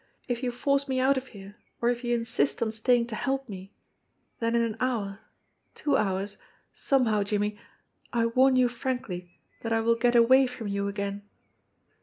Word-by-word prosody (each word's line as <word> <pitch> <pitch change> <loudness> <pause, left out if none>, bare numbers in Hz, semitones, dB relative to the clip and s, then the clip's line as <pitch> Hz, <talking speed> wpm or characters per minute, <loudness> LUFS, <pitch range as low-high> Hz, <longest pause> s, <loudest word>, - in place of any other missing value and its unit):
If 245 -1 -2
you 250 -2 -1
force 280 +3 0
me 260 -1 0
out 265 +2 +4
of 260 0 -4
here, 200 -2 -12 0.2
or 235 - +2
if 245 0 -2
you 240 0 +1
insist 225 -13 0
on 220 - -1
staying 235 +2 +2
to 235 -2 -6
help 270 +2 -2
me, 195 -2 -9 0.6
then 230 0 0
in 235 - +3
an 225 -2 -2
hour, 220 -6 -1 0.6
two 285 -2 0
hours, 200 -1 -1 0.4
somehow, 235 -6 +2
Jimmie, 205 +1 -1 0.5
I 230 -1 +1
warn 255 +3 +4
you 255 -1 +5
frankly 240 -8 -5 0.2
that 225 - -4
I 225 - +3
will 230 +1 +3
get 240 +1 +1
away 260 +3 +6
from 245 -4 -6
you 200 0 -1
again." 200 0 -4
230 Hz, 180 wpm, -27 LUFS, 205-255 Hz, 0.6 s, away